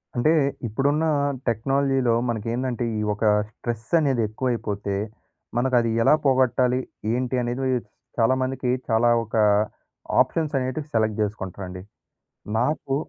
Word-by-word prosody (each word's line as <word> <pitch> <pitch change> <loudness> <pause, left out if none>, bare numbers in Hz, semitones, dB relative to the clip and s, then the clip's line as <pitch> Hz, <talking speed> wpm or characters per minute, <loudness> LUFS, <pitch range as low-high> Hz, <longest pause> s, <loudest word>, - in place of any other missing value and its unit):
అంటే 135 +6 +3 0.4
ఇప్పుడున్న 145 +8 +1 0.4
టెక్నాలజీలో 135 +1 +1 0.2
మనకేందంటే, 120 +2 -2
ఈ - - -1
ఒక 105 - -6 0.3
స్ట్రెసనేది 120 +4 0
ఎక్కువైపోతే, 105 -4 -2 0.6
మనకది 120 -2 +2
ఎలా 150 - +6
పోగొట్టాలి? 130 -1 +3 0.3
ఏంటి 125 +1 -1
అనేది 120 +2 -2 0.6
చాలామందికి 130 +2 +1 0.2
చాలా, 115 +1 +3
ఒక 115 - -7 0.9
ఆప్షన్సనేటివి 145 -2 -1
సెలెక్ట్ 110 -1 +1
జేసుకుంటారంండి. 95 -3 -4 0.8
నాకు 135 +2 0
125 Hz, 90 wpm, -24 LUFS, 115-130 Hz, 0.9 s, ఎలా